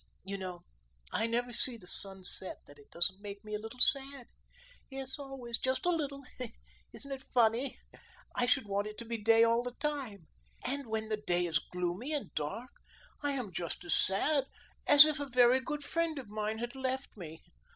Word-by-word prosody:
You 195 +1 -6
know, 180 -2 -7 0.5
I 225 - 0
never 240 +1 -2
see 240 +1 +3
the 195 - -14
sun 195 +1 +7
set 185 +1 +5
that 145 - -17
it 140 - -19
don't 185 +3 +1
make 200 0 -9
me 215 0 -9
a 210 - -2
little 225 +3 -10
sad; 275 0 +4 0.6
yes, 270 +1 -6
always, 265 -4 -6
just 260 +7 -2
a 355 - +3
little. 285 -4 -3 0.7
Isn't 280 - -11
it 270 -1 -5
funny? 240 +2 +1 0.6
I 245 - 0
should 260 -1 +2
want 200 +1 -2
it 215 - -9
to 235 - -7
be 230 0 -5
day 225 +2 +4
all 230 +1 +3
the 245 0 -7
time. 275 - -4 0.4
And 280 -1 -2
when 220 0 -4
the 215 - -1
day 175 -4 0
is 165 -3 0
gloomy 180 - -4
and 290 - -4
dark, 155 +12 -5 0.5
I 290 -1 -1
am 250 -8 -5
just 175 +1 -5
as 175 - 0
sad 270 +9 +2 0.4
as 290 0 +10
if 305 -1 -1
a 285 - -4
very 250 0 +4
good 295 +3 -5
friend 330 +1 -2
of 255 -6 -8
mine 215 +1 -3
had 240 +1 -5
left 265 0 -4
me. 165 -5 -11
235 Hz, 195 wpm, -31 LUFS, 200-270 Hz, 0.7 s, as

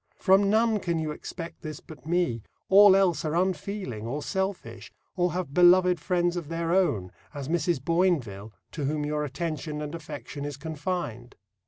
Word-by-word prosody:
From 195 +1 +4
none 220 0 +3
can 170 -3 -1
you 155 -1 -2
expect 165 +2 -8
this 155 -4 -6
but 155 -1 -13
me 170 -10 0 0.3
all 200 0 +8
else 180 -5 +2
are 155 0 -1
unfeeling, 180 - -2
or 145 +5 -3
selfish, 175 - -4 0.2
or 180 -1 +1
have 175 -6 -3
beloved 180 +1 +5
friends 175 +1 0
of 170 -4 -4
their 165 0 -1
own, 110 - +1 0.2
as 140 -2 -5
Mrs. 170 -1 0
B[oinville], 135 - 0 0.2
to 150 -4 -4
whom 150 +1 -1
their 150 0 -1
attention 150 +1 -4
and 150 0 -5
affection 145 -3 -7
is 145 -2 -5
confined. 145 -6 -4
165 Hz, 165 wpm, -27 LUFS, 145-180 Hz, 0.3 s, all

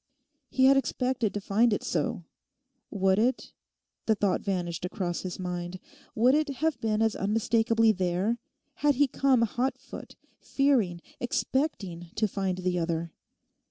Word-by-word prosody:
He 260 - +3
had 270 +1 +6
expected 255 -4 0
to - - 0
find 220 +4 +2
it 205 - -1
so. 170 +1 -2 0.7
Would 190 -1 +2
it 245 +4 0 0.5
(the 220 - +4
thought 200 -2 +1
vanished 175 -4 -3
across 180 -1 -3
his 185 -1 -5
mind) 180 0 -4 0.4
would 245 +4 +4
it 295 -2 +1
have 320 +3 -1
been 220 -1 +1
as 220 -1 +1
unmistakably 225 +2 +2
there 190 +4 0 0.4
had 290 -1 +3
he 285 +3 +4
come 260 -2 +2
hot 245 +4 -1
foot, - - -11 0.2
fearing, 235 -12 +1 0.2
expecting 210 - -2
to 215 - +1
find 190 -2 -2
the 180 -1 -1
other? 165 -1 -2
215 Hz, 145 wpm, -28 LUFS, 180-250 Hz, 0.7 s, had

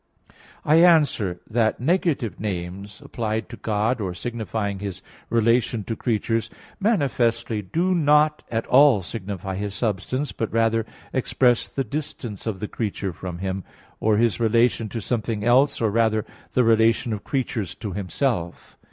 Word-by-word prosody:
I 155 +2 +5
answer 150 - +4
that, 110 -1 +1
Negative 140 - 0
names 100 0 -5
applied 110 -1 -3
to - - -7
God, 110 +3 -1
or 90 -3 -3
signifying 110 -2 -3
His 100 -2 -6 0.3
relation 115 -1 +2
to 115 - -4
creatures 115 0 -1 0.3
manifestly 120 - +1
do 170 - 0
not 150 -2 +3
at 115 0 -1
all 135 -6 +5
signify 95 -1 -5
His 100 0 -4
substance, 115 +6 -2
but 115 - -3
rather 115 0 +1 0.3
express 125 -2 +2
the 135 - -2
distance 120 -5 -6
of 105 -4 -2
the 105 - -2
creature 100 -4 -3
from 90 +1 -6
Him, 95 +1 -3 0.4
or 110 -1 +2
His 115 0 +2
relation 115 0 +2
to 115 - -4
something 110 -1 -2
else, 130 +4 +4
or 110 -2 +1
rather, 110 -1 +2 0.3
the 125 - +4
relation 115 0 +3
of 105 - -5
creatures 120 - -2
to 105 -2 -6
Himself. 95 -1 -3
115 Hz, 145 wpm, -24 LUFS, 105-125 Hz, 0.4 s, I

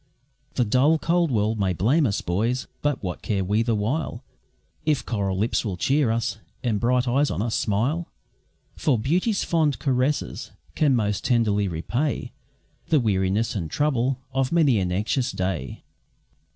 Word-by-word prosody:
The 125 - +2
dull, 130 +9 +3
cold 170 +1 +1
world 110 -2 0
may 95 -2 +1
blame 130 - +2
us, 100 - -1
boys! 115 +9 -1 0.2
but 145 -5 -1
what 90 -2 -4
care 100 -3 -1
we 105 +4 +1
the 115 -1 +1
while, 120 +4 -2 0.6
If 155 -2 0
coral 100 -4 -1
lips 110 +4 +1
will 100 -6 -3
cheer 135 - +2
us, 115 -1 -1 0.2
and 115 -4 0
bright 125 +2 +2
eyes 140 +4 +2
on 80 - -3
us 115 -1 -2
smile? 125 +12 0 0.7
For 140 -6 +1
beauty's 180 - +1
fond 155 -6 +1
caresses 130 - -1 0.2
can 145 -4 +3
most 105 -4 0
tenderly 105 -5 +2
repay 120 - -2 0.6
The 155 - +4
weariness 105 -1 +1
and 85 -7 -3
trouble 135 - +1 0.2
of 135 -1 0
many 150 -10 +4
an 90 -2 -1
anxious 105 +7 0
day. 90 -8 -3
120 Hz, 155 wpm, -24 LUFS, 100-140 Hz, 0.7 s, The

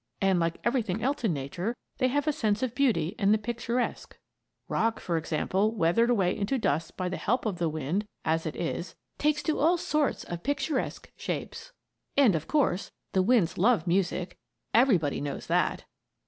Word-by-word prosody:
And, 190 -2 +3
like 165 0 0
everything 225 -4 0
else 275 0 0
in 220 - +2
Nature, 175 - -3 0.2
they 255 - +3
have 290 +3 0
a 305 - +2
sense 215 -3 0
of 250 -3 -1
beauty 210 - +1
and 200 -1 +3
the 215 - +5
picturesque. 235 +2 -3 0.5
Rock, 225 0 0
for 170 - -2
example, 190 +7 0
weathered 210 +6 +3
away 195 -7 +2
into 210 +7 0
dust 160 - -1
by 185 - -1
the 185 - -3
help 245 +3 0
of 195 -5 -2
the 170 -2 +1
winds, 155 +7 -2 0.2
as 160 0 +1
it 155 - -4
is, 170 +1 -3 0.2
takes 300 +1 +1
on 310 - +2
all 335 +4 +4
sorts 300 -4 0
of 175 -1 -6
picturesque 285 - -2
shapes. - - -5 0.5
And, 265 -8 +6
of 155 -1 -2
course, 230 - +1 0.2
the 190 - +3
winds 190 -6 +2
love 225 +3 +3
music; 180 0 0 0.3
everybody 205 - +3
knows 145 -1 -4
that. - - 0
205 Hz, 175 wpm, -28 LUFS, 170-245 Hz, 0.5 s, And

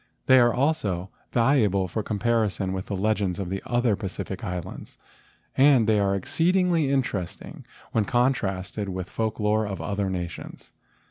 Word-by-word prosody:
They 130 0 +7
are 120 -1 +5
also 110 - -1 0.2
valuable 115 -7 +2
for 90 +5 -3
comparison 105 -3 0
with 95 0 -4
the 100 - -3
legends 100 -2 0
of 95 -3 -4
the 95 - -3
other 120 -3 +2
Pacific 95 -1 -6
islands, 90 0 -6 0.6
and 135 -4 +5
they 105 -1 +3
are 100 -1 +1
exceedingly 170 - +1
interesting 115 -10 -3 0.2
when 110 -2 +1
contrasted 105 -6 -1
with 95 -1 -4
the - - -22
folk 110 -1 -2
lore 105 0 +1
of 100 -1 -5
other 100 -1 -2
nations. 90 -3 -6
105 Hz, 150 wpm, -25 LUFS, 95-120 Hz, 0.6 s, They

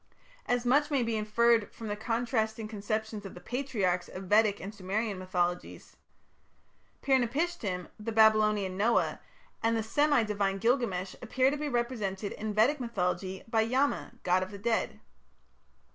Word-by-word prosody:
As 245 0 0
much 290 +4 +3
may 275 -4 +1
be 230 -1 -1
inferred 220 +1 +2
from 225 - -8
the 205 - -2
contrasting 225 0 -1
conceptions 215 0 -3
of 195 - -9
the - - -9
Patriarchs 210 -8 -1
of 185 - -8
Vedic 210 +1 +3
and 200 +3 -7
Sumerian 205 +1 -2
mythologies. 180 -1 -3 1.1
Pir 270 -1 +4
napishtim, 240 - -2
the 220 +2 -4
Babylonian 215 -3 +4
Noah, 220 +5 +1 0.4
and 230 0 +2
the 220 - -1
semi 290 +2 +3
divine 200 -2 -1
Gilgamesh 210 -5 0
appear 255 +3 +2
to - - -1
be 295 0 -3
represented 225 -6 -2
in 215 0 -4
Vedic 255 +8 +3
mythology 190 -5 -2
by 225 -1 +2
Yama, 260 +6 0
god 180 +1 +3
of 185 - -3
the 205 - -8
dead. 225 +3 -1
220 Hz, 150 wpm, -30 LUFS, 195-240 Hz, 1.1 s, Pir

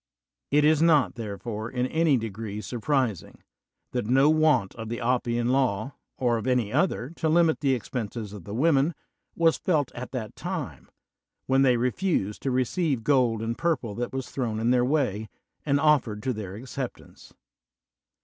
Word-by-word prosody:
It 150 +1 +4
is 155 0 +4
not, 150 - +4
therefore, 110 0 -5
in 125 0 -1
any 160 0 +2
degree 110 -2 -5
surprising 120 - -2 0.5
that 125 -4 -2
no 135 +5 +5
want 155 -11 +3
of 115 -1 -7
the 120 - -3
Oppian 120 -1 0
Law, 130 -2 0 0.2
or 120 -2 +1
of 115 - -4
any 125 -4 +1
other, 145 -4 0
to 160 - 0
limit 165 0 +3
the 135 -3 +2
expenses 110 -3 -5
of 100 -4 -9
the 100 +5 -7
women, 150 +3 +2 0.4
was 165 -1 +3
felt 150 -7 +1
at 125 +1 -7
that 115 -5 -5
time, - - -5 0.6
when 135 +1 +3
they 125 -3 +4
refused 125 - -1
to 135 - -1
re 130 0 +2
ceive 140 -3 -1
gold 120 -5 +2
and 115 +1 -3
purple 150 -10 0
that 120 +3 -3
was 130 -1 -5
thrown 115 -5 -2
in 115 +2 +2
their 125 -1 +3
way 125 -7 0 0.4
and 140 0 +3
oflPered 140 -8 +2
to 130 -1 0
their 100 -4 -6
acceptance. 130 +2 -8
125 Hz, 170 wpm, -26 LUFS, 115-145 Hz, 0.6 s, no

